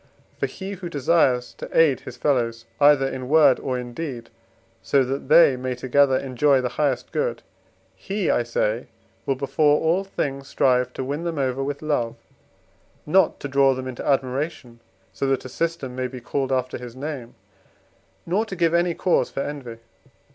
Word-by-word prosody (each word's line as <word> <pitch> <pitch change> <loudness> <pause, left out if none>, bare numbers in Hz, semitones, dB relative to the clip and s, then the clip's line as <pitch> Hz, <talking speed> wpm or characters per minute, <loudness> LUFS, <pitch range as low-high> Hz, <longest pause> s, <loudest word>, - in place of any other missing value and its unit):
For - - 0
he 190 0 -7
who 185 -3 -6
desires 135 -4 +2
to - - -6
aid 150 -6 +5
his - - -10
fellows 115 -5 0
either 145 -2 +5
in 130 -1 -5
word 150 -4 +5
or 130 -2 -2
in 120 -1 -6
deed, 125 -6 -6 0.5
so 140 -1 +2
that 135 +1 -4
they 155 -4 +7
may 125 0 -3
together 130 +2 +3
enjoy 135 +1 +2
the 125 -1 -1
highest 140 -5 0
good, 485 +1 -2 0.5
he, 195 -1 -3
I - - +3
say, 115 -1 -1 0.4
will 135 - +2
before 145 +2 +2
all 170 +4 +1
things 140 -8 -4
strive 125 -2 +2
to - - -4
win 145 +5 -3
them 170 -2 -3
over 135 -1 -1
with 145 +2 -4
love: 120 -7 -1 0.9
not 180 +3 +3
to - - -3
draw 135 -1 +3
them 130 0 -5
into 130 -2 -6
admiration, 135 -2 -2 0.3
so 135 +8 -2
that 135 -1 0
a - - -6
system 160 -4 -3
may 130 0 -2
be 125 0 -8
called 135 +2 -2
after 130 -1 -1
his 120 -1 -9
name, 135 -3 -6 0.9
nor 190 +6 +1
to 195 - -6
give 170 -2 +1
any 170 0 +2
cause 185 - +1
for - - -4
envy. 135 -6 -6
135 Hz, 175 wpm, -23 LUFS, 125-155 Hz, 0.9 s, they